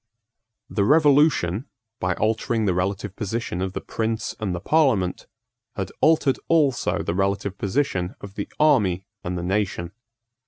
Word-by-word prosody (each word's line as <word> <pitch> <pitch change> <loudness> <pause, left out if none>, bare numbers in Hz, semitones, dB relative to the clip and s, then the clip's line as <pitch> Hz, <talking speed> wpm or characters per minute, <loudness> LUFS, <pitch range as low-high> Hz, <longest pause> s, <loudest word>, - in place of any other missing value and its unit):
The 100 - 0
Revolution, 145 - +4 0.3
by 90 -1 0
altering 110 +1 0
the 95 - +2
relative 95 +2 -2
position 105 -3 -3
of 95 0 -2
the - - -4
prince 110 0 -2
and 100 -5 -2
the - - -3
parliament, 110 - +1 0.5
had 95 -2 -4
altered 155 -4 +3
also 150 -6 +2
the - - -2
relative 100 +1 -1
position 100 -5 -1
of 100 -1 -10
the - - -5
army 105 - +3 0.2
and 90 +1 -3
the 85 - -4
nation. 95 -2 -1
100 Hz, 145 wpm, -24 LUFS, 95-130 Hz, 0.5 s, Revolution